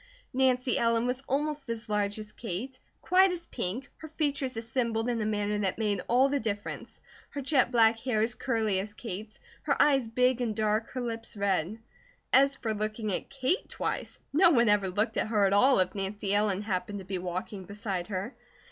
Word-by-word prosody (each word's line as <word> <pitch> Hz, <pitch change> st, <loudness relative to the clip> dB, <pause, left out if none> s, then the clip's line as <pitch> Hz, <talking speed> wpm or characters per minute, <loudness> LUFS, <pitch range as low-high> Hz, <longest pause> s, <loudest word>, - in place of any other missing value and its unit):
Nancy 255 Hz, -1 st, +2 dB
Ellen 230 Hz, 0 st, +2 dB
was 250 Hz, +1 st, -1 dB
almost 290 Hz, -1 st, -1 dB
as 230 Hz, -1 st, -4 dB
large 205 Hz, -1 st, 0 dB
as 215 Hz, -1 st, -8 dB
Kate, 230 Hz, +6 st, -6 dB, 0.2 s
quite 375 Hz, +1 st, +5 dB
as 345 Hz, -1 st, -4 dB
pink, 215 Hz, -, -4 dB
her 315 Hz, -, -9 dB
features 285 Hz, -5 st, -2 dB
assembled 225 Hz, 0 st, -1 dB
in 235 Hz, -2 st, 0 dB
a 210 Hz, -, 0 dB
manner 210 Hz, -1 st, 0 dB
that 195 Hz, -3 st, -1 dB
made 205 Hz, -4 st, 0 dB
all 255 Hz, +3 st, +4 dB
the 280 Hz, 0 st, 0 dB
difference, 205 Hz, -4 st, -5 dB, 0.3 s
her 285 Hz, -, -6 dB
jet 265 Hz, -3 st, +2 dB
black 225 Hz, -2 st, +4 dB
hair 225 Hz, -3 st, 0 dB
as 230 Hz, +1 st, +1 dB
curly 220 Hz, -6 st, 0 dB
as 205 Hz, +2 st, -5 dB
Kate's, 215 Hz, -1 st, -7 dB, 0.2 s
her -, -, 0 dB
eyes 275 Hz, -5 st, +4 dB
big 250 Hz, +2 st, +2 dB
and 225 Hz, -3 st, -1 dB
dark, 215 Hz, +1 st, 0 dB
her 255 Hz, -, -3 dB
lips 230 Hz, -2 st, -5 dB
red. 195 Hz, 0 st, 0 dB, 0.6 s
As 275 Hz, +1 st, +5 dB
for 225 Hz, -4 st, -2 dB
looking 215 Hz, 0 st, -2 dB
at -, -, -3 dB
Kate 275 Hz, +8 st, -1 dB
twice, -, -, -3 dB, 0.2 s
no 340 Hz, +4 st, +6 dB
one 235 Hz, -8 st, +4 dB
ever 205 Hz, -2 st, +3 dB
looked 215 Hz, +4 st, -1 dB
at -, -, +1 dB
her 210 Hz, -2 st, +3 dB
at 195 Hz, -, +2 dB
all 255 Hz, +6 st, +5 dB
if 185 Hz, -1 st, +1 dB
Nancy 200 Hz, 0 st, -3 dB
Ellen 205 Hz, -1 st, +1 dB
happened 205 Hz, 0 st, -2 dB
to 190 Hz, -, -8 dB
be 190 Hz, -1 st, -3 dB
walking 185 Hz, +2 st, -5 dB
beside 200 Hz, -3 st, -3 dB
her. 200 Hz, +5 st, -4 dB
225 Hz, 195 wpm, -29 LUFS, 205-255 Hz, 0.6 s, no